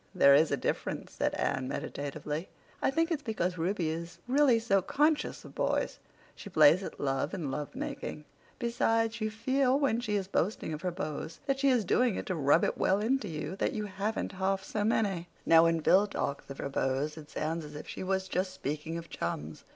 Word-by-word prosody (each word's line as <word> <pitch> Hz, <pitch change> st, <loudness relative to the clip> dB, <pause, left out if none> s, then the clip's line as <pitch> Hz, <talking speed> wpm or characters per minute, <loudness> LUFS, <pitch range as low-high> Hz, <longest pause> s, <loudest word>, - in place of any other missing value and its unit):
"There 140 Hz, -, +7 dB
is 150 Hz, +3 st, +5 dB
a 140 Hz, -, +1 dB
difference," -, -, -3 dB
said -, -, 0 dB
Anne 130 Hz, -1 st, -1 dB
meditatively. 150 Hz, +3 st, -4 dB, 0.3 s
"I -, -, +3 dB
think 330 Hz, +5 st, +1 dB
it's 310 Hz, -3 st, 0 dB
because 185 Hz, -, -2 dB
Ruby 175 Hz, -1 st, 0 dB
is 170 Hz, +1 st, -6 dB
really 265 Hz, -2 st, +5 dB
so 205 Hz, -4 st, +2 dB
conscious 295 Hz, -, +1 dB
of -, -, -11 dB
boys. -, -, 0 dB, 0.3 s
She 205 Hz, -, -10 dB
plays 155 Hz, 0 st, +6 dB
at -, -, -7 dB
love 135 Hz, +5 st, -1 dB
and 155 Hz, -7 st, -3 dB
love 145 Hz, +1 st, -4 dB
making. 150 Hz, -, -5 dB, 0.3 s
Besides, 230 Hz, -1 st, +1 dB
you 215 Hz, -, +1 dB
feel, 260 Hz, +4 st, +1 dB
when 265 Hz, -5 st, +2 dB
she 215 Hz, -4 st, -1 dB
is 195 Hz, -2 st, -1 dB
boasting 190 Hz, -3 st, -1 dB
of 155 Hz, -, -5 dB
her 180 Hz, -, 0 dB
beaux 170 Hz, -4 st, -4 dB, 0.2 s
that 275 Hz, -1 st, 0 dB
she 280 Hz, 0 st, +4 dB
is 245 Hz, -5 st, +3 dB
doing 240 Hz, +3 st, +3 dB
it -, -, -4 dB
to 185 Hz, -, -2 dB
rub 145 Hz, +2 st, +4 dB
it -, -, 0 dB
well 195 Hz, -, +3 dB
into 230 Hz, +1 st, 0 dB
you 155 Hz, +1 st, -4 dB
that -, -, 0 dB
you 215 Hz, -1 st, -2 dB
haven't 200 Hz, +3 st, -2 dB
half 190 Hz, 0 st, -1 dB
so 210 Hz, +1 st, -2 dB
many. 200 Hz, -5 st, +1 dB, 0.2 s
Now, 165 Hz, 0 st, +7 dB
when 165 Hz, 0 st, +3 dB
Phil 195 Hz, +6 st, +5 dB
talks 140 Hz, -7 st, -3 dB
of 135 Hz, -, -7 dB
her 140 Hz, -, -3 dB
beaux 135 Hz, +2 st, 0 dB
it 155 Hz, -2 st, -11 dB
sounds 160 Hz, +2 st, -2 dB
as 150 Hz, 0 st, -10 dB
if 150 Hz, -, -8 dB
she -, -, -6 dB
was 190 Hz, 0 st, -1 dB
just 185 Hz, 0 st, -1 dB
speaking 155 Hz, +2 st, -4 dB
of 170 Hz, 0 st, -7 dB
chums. 80 Hz, -, -5 dB
185 Hz, 210 wpm, -30 LUFS, 155-220 Hz, 0.3 s, There